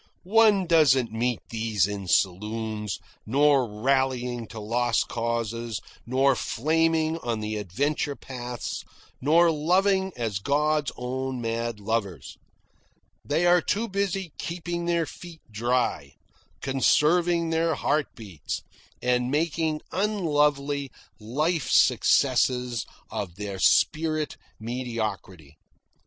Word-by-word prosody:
One 210 Hz, 0 st, +4 dB
doesn't 135 Hz, -8 st, +4 dB
meet 120 Hz, +1 st, -1 dB
these 110 Hz, -4 st, +1 dB
in 100 Hz, -2 st, -5 dB
saloons, 105 Hz, +3 st, 0 dB, 0.3 s
nor 140 Hz, +1 st, +3 dB
rallying 125 Hz, +1 st, 0 dB
to 110 Hz, -, -9 dB
lost 115 Hz, +2 st, 0 dB
causes, 115 Hz, -1 st, -2 dB, 0.3 s
nor 135 Hz, +2 st, +3 dB
flaming 160 Hz, +5 st, +1 dB
on 120 Hz, -6 st, -2 dB
the 105 Hz, 0 st, -3 dB
adventure 140 Hz, -, -1 dB
paths, 125 Hz, -3 st, -6 dB, 0.4 s
nor 165 Hz, +5 st, +5 dB
loving 190 Hz, +5 st, +2 dB
as 110 Hz, -5 st, -2 dB
God's 150 Hz, +4 st, +1 dB
own 130 Hz, +1 st, -3 dB
mad 115 Hz, -1 st, -3 dB
lovers. 100 Hz, -, -3 dB, 0.9 s
They 160 Hz, +4 st, 0 dB
are 175 Hz, 0 st, +5 dB
too 215 Hz, +7 st, -1 dB
busy 195 Hz, -3 st, -2 dB
keeping 170 Hz, 0 st, -4 dB
their 170 Hz, -1 st, +1 dB
feet 170 Hz, 0 st, -11 dB
dry, 115 Hz, -, -1 dB, 0.5 s
conserving 165 Hz, +5 st, +2 dB
their 165 Hz, 0 st, +1 dB
heart 150 Hz, +1 st, 0 dB
beats, 100 Hz, -, -6 dB, 0.4 s
and 125 Hz, 0 st, +1 dB
making 155 Hz, +1 st, 0 dB
unlovely 150 Hz, -8 st, +1 dB, 0.3 s
life 150 Hz, +9 st, -1 dB
successes 125 Hz, -3 st, +3 dB, 0.2 s
of 90 Hz, -4 st, -4 dB
their 100 Hz, -1 st, -5 dB
spirit 155 Hz, +6 st, +2 dB, 0.2 s
mediocrity. 110 Hz, -, -5 dB
130 Hz, 105 wpm, -26 LUFS, 115-160 Hz, 0.9 s, nor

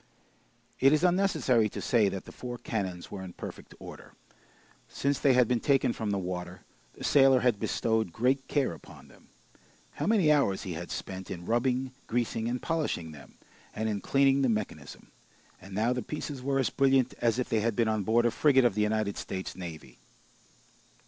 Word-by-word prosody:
It 135 Hz, +2 st, +5 dB
is 155 Hz, +2 st, +2 dB
unnecessary 160 Hz, -, +2 dB
to -, -, -7 dB
say 110 Hz, -5 st, +2 dB
that 95 Hz, -, -6 dB
the -, -, -10 dB
four 120 Hz, -1 st, -7 dB
cannons 95 Hz, -7 st, -4 dB
were 100 Hz, -, -6 dB
in 95 Hz, -2 st, -8 dB
perfect -, -, -9 dB
order. -, -, -11 dB, 0.8 s
Since 140 Hz, +1 st, -1 dB
they 135 Hz, -, +4 dB
had 125 Hz, -2 st, +4 dB
been 125 Hz, 0 st, +1 dB
taken 135 Hz, -2 st, +2 dB
from 110 Hz, -2 st, -4 dB
the 100 Hz, -, 0 dB
water, 90 Hz, -1 st, -5 dB, 0.3 s
the -, -, -11 dB
sailor 135 Hz, -2 st, +5 dB
had 120 Hz, -5 st, +2 dB
bestowed 110 Hz, -4 st, 0 dB
great 130 Hz, +7 st, 0 dB
care 140 Hz, -, 0 dB
upon 80 Hz, -, -14 dB
them. -, -, -20 dB, 0.7 s
How -, -, 0 dB
many 200 Hz, -8 st, +4 dB
hours 140 Hz, -10 st, +2 dB
he 90 Hz, -, -4 dB
had 85 Hz, +2 st, -6 dB
spent, 95 Hz, -1 st, -6 dB
in 85 Hz, -1 st, -6 dB
rubbing, 125 Hz, +3 st, 0 dB, 0.2 s
greasing, 115 Hz, -1 st, -1 dB
and 125 Hz, +1 st, -2 dB
polishing 150 Hz, -, -2 dB
them, 75 Hz, -2 st, -14 dB, 0.4 s
and 110 Hz, -, -2 dB
in 105 Hz, -2 st, -2 dB
cleaning 135 Hz, 0 st, +3 dB
the 130 Hz, -, +2 dB
mechanism! 110 Hz, -2 st, -4 dB, 0.5 s
And 95 Hz, 0 st, -10 dB
now 115 Hz, +4 st, +2 dB
the 125 Hz, -, -3 dB
pieces 145 Hz, +1 st, -6 dB
were 135 Hz, +1 st, 0 dB
as 130 Hz, -, +1 dB
brilliant 135 Hz, -2 st, +2 dB
as 115 Hz, -1 st, +2 dB
if 125 Hz, -, -1 dB
they 110 Hz, -, +2 dB
had 110 Hz, 0 st, 0 dB
been 115 Hz, +1 st, +2 dB
on 110 Hz, -1 st, 0 dB
board 115 Hz, +4 st, +2 dB
a 120 Hz, -, +3 dB
frigate 135 Hz, -1 st, +4 dB
of 120 Hz, -, +3 dB
the 105 Hz, -, -1 dB
United 105 Hz, -1 st, 0 dB
States 95 Hz, -1 st, -5 dB
Navy. 85 Hz, -4 st, -9 dB
120 Hz, 190 wpm, -29 LUFS, 100-135 Hz, 0.8 s, It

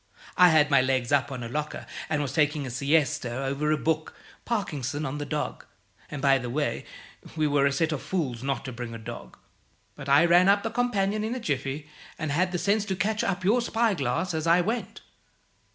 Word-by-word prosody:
I 180 Hz, -1 st, +7 dB
had 150 Hz, -2 st, +4 dB
my 140 Hz, -2 st, +6 dB
legs 130 Hz, -1 st, 0 dB
up 140 Hz, 0 st, +2 dB
on 125 Hz, -2 st, -5 dB
a -, -, -4 dB
locker, 150 Hz, +5 st, -4 dB, 0.2 s
and 150 Hz, -2 st, 0 dB
was 140 Hz, -1 st, -4 dB
taking 150 Hz, -1 st, +1 dB
a 130 Hz, -, -5 dB
siesta 140 Hz, -1 st, 0 dB
over 140 Hz, +3 st, 0 dB
a 155 Hz, -, +2 dB
book 155 Hz, +1 st, -1 dB, 0.3 s
'Parkinson 155 Hz, -, -2 dB
On 140 Hz, +2 st, -4 dB
The 145 Hz, -, -4 dB
Dog' 150 Hz, 0 st, -3 dB, 0.5 s
and, 145 Hz, -1 st, -6 dB
by 135 Hz, -1 st, +5 dB
the 125 Hz, -1 st, -5 dB
way, 145 Hz, +4 st, -2 dB, 0.5 s
we 155 Hz, -1 st, +1 dB
were 145 Hz, -1 st, +3 dB
a -, -, +1 dB
set 160 Hz, +4 st, 0 dB
of 150 Hz, -, -3 dB
fools 135 Hz, -11 st, -2 dB
not 135 Hz, 0 st, -2 dB
to 130 Hz, -, -5 dB
bring 120 Hz, -1 st, -6 dB
a -, -, -5 dB
dog; 110 Hz, -, -9 dB, 0.6 s
but 140 Hz, -, -8 dB
I 140 Hz, +4 st, +6 dB
ran 175 Hz, +2 st, +5 dB
up 200 Hz, 0 st, +4 dB
the 225 Hz, -, -2 dB
companion 215 Hz, -4 st, 0 dB
in 225 Hz, +3 st, -2 dB
a -, -, -3 dB
jiffy, 145 Hz, -, -3 dB, 0.3 s
and 155 Hz, -2 st, -3 dB
had 180 Hz, +5 st, +1 dB
the 180 Hz, -, -1 dB
sense 205 Hz, +3 st, +1 dB
to 195 Hz, -2 st, -2 dB
catch 210 Hz, +4 st, 0 dB
up 190 Hz, -1 st, -2 dB
your 230 Hz, +6 st, +4 dB
spyglass 185 Hz, -, 0 dB
as 160 Hz, 0 st, -2 dB
I 170 Hz, +2 st, +5 dB
went. 225 Hz, +7 st, -2 dB
150 Hz, 215 wpm, -27 LUFS, 135-185 Hz, 0.6 s, I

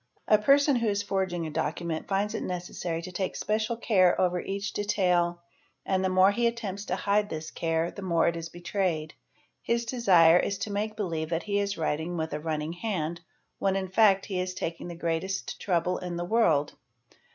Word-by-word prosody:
__ -, -, -44 dB, 0.2 s
A 215 Hz, -, +5 dB
person 280 Hz, +3 st, +4 dB
who 230 Hz, -1 st, 0 dB
is 205 Hz, -1 st, 0 dB
forging 190 Hz, -4 st, -1 dB
a 155 Hz, -, -5 dB
document 160 Hz, +2 st, -3 dB
finds 205 Hz, +2 st, 0 dB
it -, -, -3 dB
necessary 175 Hz, -2 st, -4 dB
to 185 Hz, -, -7 dB
take 185 Hz, +1 st, -3 dB
special 215 Hz, +2 st, -1 dB
'care 185 Hz, -6 st, +3 dB
over 180 Hz, -1 st, +2 dB
each 195 Hz, +2 st, -4 dB
detail 180 Hz, -4 st, +1 dB, 0.4 s
and 190 Hz, 0 st, +1 dB
the 190 Hz, -, +2 dB
more 185 Hz, +1 st, +5 dB
he 235 Hz, +3 st, +1 dB
attempts 210 Hz, -4 st, -4 dB
to 180 Hz, -, -1 dB
hide 205 Hz, +2 st, +1 dB
this 160 Hz, 0 st, -5 dB
care 165 Hz, 0 st, -1 dB
the 200 Hz, -, -9 dB
more 170 Hz, -3 st, +2 dB
'is 165 Hz, -1 st, -2 dB
it -, -, -19 dB
betrayed: 175 Hz, -3 st, -2 dB, 0.5 s
his 235 Hz, 0 st, 0 dB
desire 180 Hz, -9 st, +5 dB
is 200 Hz, -, -1 dB
to 210 Hz, -, -4 dB
make 215 Hz, +2 st, -2 dB
believe 165 Hz, -7 st, -3 dB
that 165 Hz, 0 st, -1 dB
he 205 Hz, -1 st, 0 dB
is 200 Hz, 0 st, -1 dB
writing 160 Hz, +2 st, -2 dB
with 160 Hz, -1 st, -3 dB
a 150 Hz, -, -2 dB
run 155 Hz, 0 st, -2 dB
ning 155 Hz, +2 st, -4 dB
hand 175 Hz, -4 st, -3 dB, 0.4 s
when 195 Hz, -1 st, +1 dB
in 190 Hz, -1 st, -2 dB
fact 195 Hz, -1 st, +4 dB
he 190 Hz, -3 st, -3 dB
is 185 Hz, 0 st, -3 dB
taking 170 Hz, -1 st, -4 dB
the 175 Hz, -, -7 dB
greatest 170 Hz, +3 st, -3 dB
trouble 180 Hz, -1 st, 0 dB
in 175 Hz, -1 st, -5 dB
the 175 Hz, -, -2 dB
world. 170 Hz, -9 st, +2 dB
185 Hz, 205 wpm, -28 LUFS, 170-205 Hz, 0.5 s, A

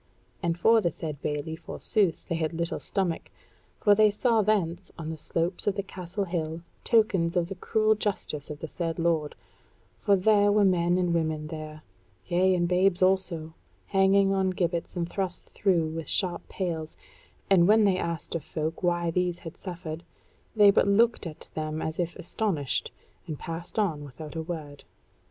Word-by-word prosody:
And 170 Hz, 0 st, 0 dB
for 225 Hz, +5 st, +5 dB
the 175 Hz, -, +2 dB
said 150 Hz, -3 st, -6 dB
bailey, 150 Hz, +2 st, -3 dB
forsooth, 180 Hz, +1 st, -1 dB
they 170 Hz, -, -2 dB
had 165 Hz, -1 st, -1 dB
but -, -, -5 dB
little 170 Hz, 0 st, -1 dB
stomach; 185 Hz, -5 st, -2 dB, 0.5 s
for 205 Hz, -, +5 dB
they 215 Hz, +1 st, +5 dB
saw 225 Hz, +2 st, +2 dB
thence, 190 Hz, -4 st, 0 dB
on 160 Hz, -2 st, -5 dB
the -, -, -4 dB
slopes 170 Hz, +5 st, -1 dB
of 200 Hz, -, +2 dB
the 200 Hz, -, -2 dB
Castle 185 Hz, +1 st, -4 dB
hill, 165 Hz, -2 st, -3 dB, 0.2 s
tokens 195 Hz, -7 st, +2 dB
of 170 Hz, 0 st, +1 dB
the -, -, -3 dB
cruel 215 Hz, +4 st, +2 dB
justice 195 Hz, -8 st, -3 dB
of 150 Hz, -1 st, -7 dB
the 160 Hz, -, -4 dB
said 165 Hz, +1 st, -3 dB
lord; 165 Hz, -3 st, 0 dB, 0.6 s
for 200 Hz, -2 st, +4 dB
there 205 Hz, +1 st, +4 dB
were 205 Hz, 0 st, +4 dB
men 175 Hz, -1 st, +3 dB
and 180 Hz, -2 st, +1 dB
women 160 Hz, -2 st, 0 dB
there, 155 Hz, -1 st, -7 dB, 0.4 s
yea, 185 Hz, +2 st, +3 dB
and 175 Hz, -1 st, +1 dB
babes 185 Hz, +1 st, +3 dB
also, 185 Hz, -4 st, +1 dB, 0.3 s
hanging 195 Hz, 0 st, +4 dB
on 190 Hz, -1 st, +2 dB
gibbets 175 Hz, -2 st, -2 dB
and 170 Hz, -1 st, -1 dB
thrust 185 Hz, -1 st, -4 dB
through 170 Hz, -5 st, +1 dB
with 160 Hz, -1 st, -5 dB
sharp 180 Hz, -3 st, -1 dB
pales, 165 Hz, -4 st, -4 dB, 0.5 s
and 180 Hz, -3 st, +5 dB
when 215 Hz, +1 st, +6 dB
they 190 Hz, -3 st, +3 dB
asked 170 Hz, -2 st, -3 dB
of 165 Hz, -, -2 dB
folk 160 Hz, +1 st, -4 dB
why 175 Hz, -2 st, +1 dB
these 180 Hz, 0 st, 0 dB
had 165 Hz, 0 st, -9 dB
suffered, 170 Hz, -3 st, -6 dB, 0.5 s
they 205 Hz, -2 st, +7 dB
but 200 Hz, -, +3 dB
looked 225 Hz, -1 st, +3 dB
at 155 Hz, -, -10 dB
them 155 Hz, 0 st, -3 dB
as 160 Hz, +1 st, -4 dB
if 175 Hz, -1 st, -1 dB
astonished, 165 Hz, -, -1 dB, 0.4 s
and 155 Hz, -3 st, -4 dB
passed 165 Hz, +6 st, -6 dB
on 170 Hz, -9 st, 0 dB
without 145 Hz, +3 st, -9 dB
a 160 Hz, -, -2 dB
word. 155 Hz, -4 st, -7 dB
175 Hz, 180 wpm, -27 LUFS, 160-195 Hz, 0.6 s, they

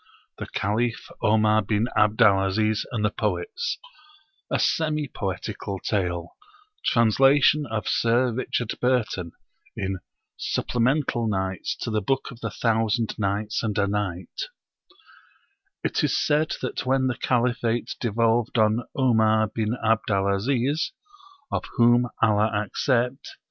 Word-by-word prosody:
THE -, -, -5 dB
CALIPH 115 Hz, +3 st, -2 dB
OMAR 110 Hz, 0 st, +3 dB
BIN 105 Hz, +3 st, 0 dB
ABD 105 Hz, +3 st, +4 dB
AL 95 Hz, -2 st, +4 dB
AZIZ 110 Hz, +2 st, 0 dB
AND 110 Hz, -4 st, -1 dB
THE 105 Hz, -, +1 dB
POETS 475 Hz, -, -2 dB, 0.7 s
A -, -, +1 dB
Semi 155 Hz, -2 st, 0 dB
Poetical 95 Hz, -2 st, -4 dB
Tale: 90 Hz, -4 st, -2 dB, 0.5 s
Translation 135 Hz, +5 st, +4 dB
of 110 Hz, -2 st, -3 dB
Sir 120 Hz, +2 st, +2 dB
Richard 120 Hz, -1 st, -2 dB
Burton, 115 Hz, -9 st, 0 dB, 0.4 s
in 95 Hz, -1 st, -2 dB, 0.4 s
'Supplemental 125 Hz, -1 st, 0 dB
Nights 95 Hz, -3 st, -2 dB
to -, -, -3 dB
the 110 Hz, -1 st, 0 dB
Book 135 Hz, +3 st, -1 dB
of 120 Hz, -, -12 dB
The -, -, -3 dB
Thousand 115 Hz, -1 st, 0 dB
Nights 105 Hz, +2 st, -1 dB
and 110 Hz, -2 st, -2 dB
A 100 Hz, -, +3 dB
Night' 100 Hz, -3 st, -3 dB, 1.4 s
It -, -, 0 dB
is -, -, +2 dB
said 150 Hz, +1 st, +1 dB
that 130 Hz, -, -3 dB
when 130 Hz, +1 st, +1 dB
the 130 Hz, -1 st, 0 dB
Caliphate 120 Hz, -1 st, 0 dB
devolved 115 Hz, +1 st, +1 dB
on 110 Hz, +1 st, +3 dB, 0.2 s
Omar 110 Hz, -4 st, +3 dB
bin 110 Hz, +2 st, -1 dB
Abd 110 Hz, 0 st, +2 dB
al 100 Hz, -1 st, +2 dB
Aziz, 130 Hz, -, 0 dB, 0.6 s
(of -, -, -1 dB
whom 120 Hz, +1 st, +4 dB
Allah 110 Hz, -1 st, +3 dB, 0.2 s
accept!) 125 Hz, +4 st, -1 dB
115 Hz, 130 wpm, -25 LUFS, 105-125 Hz, 1.4 s, ABD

